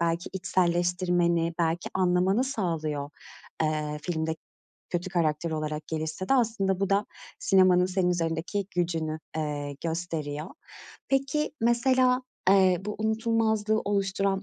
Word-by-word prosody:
belki 170 +1 -1
içselleştirmeni, 175 -2 +1
belki 165 0 0
anlamanı 185 +5 +2
sağlıyor, 160 - -2 0.5
eee, 150 -1 -1
filmde 160 -2 -2 0.5
kötü 175 +1 -2
karakter 165 -2 0
olarak 155 -1 -3
gelişse 160 +3 -3
de. - - +4
Aslında 210 -6 +1
bu 195 - 0
da 200 +1 +2 0.3
sinemanın 185 -1 +4
senin 185 -1 +1
üzerindeki 170 +3 -1
gücünü, 165 -3 -1 0.2
eee, 145 -2 -3
gösteriyor. 160 -3 -3 0.6
Peki, 275 +3 +1
mesela, 250 +2 +3 0.3
eee, 190 -2 +5
bu 210 - -3
unutulmazlığı 220 -1 +1
oluşturan 195 -1 0
180 Hz, 110 wpm, -27 LUFS, 160-200 Hz, 0.6 s, eee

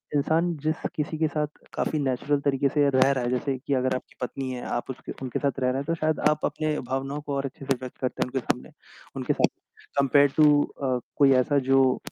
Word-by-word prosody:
इंसान 165 +4 +2
जिस 155 +1 -1
किसी 155 +1 -2
के 160 - +3
साथ 150 -1 -1 0.3
काफ़ी 155 - -1
नेचुरल 140 +1 0
तरीके 140 -1 +1
से 145 0 +3
रह 130 0 +4
रहा 130 -2 0
है, - - 0
जैसे 130 +2 -1
कि 140 +2 -3
अगर 130 0 +1
आपकी 130 - -7
पत्नी 130 +1 -3
है, 125 -1 -5
आप 120 - -3
उसके 130 - -9
उनके 125 -3 -2
साथ 140 -1 -1
रह 130 - +1
रहे 130 - 0
हैं, 140 - -3
तो 165 +2 0
शायद 155 -1 0
आप 150 0 0
अपने 150 +1 -1
भावनाओं 135 +2 -2
को 145 -1 -4
और 140 0 -1
अच्छे 135 +1 -7
से 135 - +2
व्यक्त 130 -1 -8
करते 130 - -3
हैं - - -4
उनके 130 +1 -1
सामने 120 - -3 0.5
उनके - - 0
साथ - - +3 0.5
कंपेयर्ड 140 0 +4
टू 150 -1 +6
अ, 130 -3 -2 0.2
कोई 140 -1 +6
ऐसा 145 +3 +1
जो 135 -1 +5
140 Hz, 235 wpm, -26 LUFS, 130-150 Hz, 0.5 s, टू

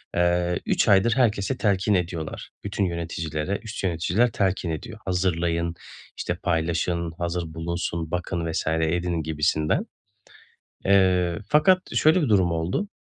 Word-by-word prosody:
eee, 85 0 +2
3 - - +2
aydır 100 +4 +4
herkese 115 -1 +1
telkin 100 0 +1
ediyorlar. 85 -4 -3
Bütün 100 -1 -1
yöneticilere 85 +1 -3
üst 110 -3 -6
yöneticiler 95 +6 +1
telkin 95 -3 0
ediyor. 110 +7 -6
"Hazırlayın, 85 -2 0 0.4
işte, 90 - -2
paylaşın, 85 0 -1
hazır 85 -2 -3
bulunsun, 85 0 -3
bakın 85 -2 -2
vs. 80 - -2
edin" 80 +1 0
gibisinden. 80 0 0 1.0
Eee, 90 -3 +3
fakat 185 +5 +3
şöyle 160 +3 +4
bir 145 - 0
durum 95 -5 +3
oldu. 85 - -1
90 Hz, 125 wpm, -25 LUFS, 85-100 Hz, 1.0 s, aydır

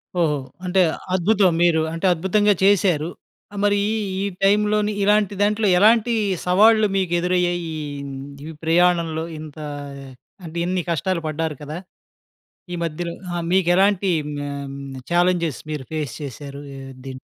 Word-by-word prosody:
ఓహో! 165 -4 +2 0.3
అంటే 185 +1 +3 0.3
అద్భుతం! 190 +1 +3
మీరు 165 -2 +4
అంటే 165 +3 -3
అద్భుతంగా 205 +5 +2
చేశారు. 180 -5 +3 0.4
ఆహ్, 205 - -5
మరి 205 0 +3 0.4
ఈ - - -1 0.2
టైంలోని 210 +1 +3
ఇలాంటి 205 0 +3
దాంట్లో, 210 +1 +2
ఎలాంటి 225 +3 +5 0.3
సవాళ్లు 215 +4 +5
మీకు 185 -3 0
ఎదురయ్యాయి? 175 0 +1
ఈ - - -4 0.3
హ్మ్, 140 -1 -6 0.3
ఈ - - -6
ప్రయాణంలో 165 -1 +2 0.2
ఇంత 155 -1 -10 0.9
అంటే, 165 +1 -7
ఇన్ని 180 0 0
కష్టాలు 170 +2 -1
పడ్డారు 155 0 -2
కదా! 150 +2 -6 1.0
ఈ - - -2
మధ్యలో 170 +1 -3 0.2
ఆ! - - -1 0.2
మీకు 185 -2 +3
ఎలాంటి 195 0 +3 0.4
ఆహ్, 140 0 -5
హ్మ్, 140 -1 -8 0.2
ఛాలెంజెస్ 175 -4 +2
మీరు 150 -4 -4
ఫేస్ 150 -6 -3
చేశారు 140 +1 -7 0.2
ఆహ్, 135 0 -9
దీం 130 -1 -7
175 Hz, 140 wpm, -22 LUFS, 155-200 Hz, 1.0 s, ఎలాంటి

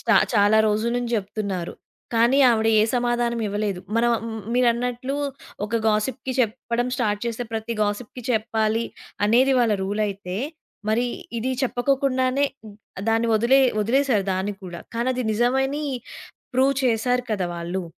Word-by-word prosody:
స్టా - - +2 0.2
చాలా 205 +1 +5
రోజుల 215 +3 0
నుంచి 240 -1 -2
జెప్తున్నారు. 200 -3 -3 0.4
కానీ, 235 +4 +4
ఆవిడ 220 -1 +2
ఏ - - +5
సమాధానం 240 -1 0
ఇవ్వలేదు. 205 -2 -2 0.2
మనం 240 +1 +3 0.2
మ్ 220 0 -5
మీరన్నట్లు 245 +2 +1 0.5
ఒక 230 +2 -1
గాసిప్‌కి 245 +4 -1
చెప్పడం 240 +1 -1
స్టార్ట్ 210 -4 0
చేస్తే 235 +1 -3
ప్రతి 225 +1 -3
గాసిప్‌కి 210 +4 -3
చెప్పాలి 220 0 +1 0.4
అనేది 255 +5 +4
వాళ్ళ 230 -3 +3
రూలయితే, 200 -2 -2 0.5
మరి 240 +3 +2 0.3
ఇది 250 +3 -1
చెప్పకోకుండానే, 260 +1 +1 0.6
దాన్ని 225 +1 +2
వదిలే 240 +5 +4 0.2
వదిలేశారు 235 -1 +2
దాన్ని 190 +2 -2
కూడా. 175 -2 -7 0.2
కానీ, 235 +2 0
అది 250 - -1
నిజమని 265 +6 +1 0.7
ప్రూవ్ 265 +2 +3
చేశారు 245 +1 +2
కదా! 190 -4 0
వాళ్ళు. 175 +2 -3
230 Hz, 130 wpm, -23 LUFS, 210-250 Hz, 0.7 s, చాలా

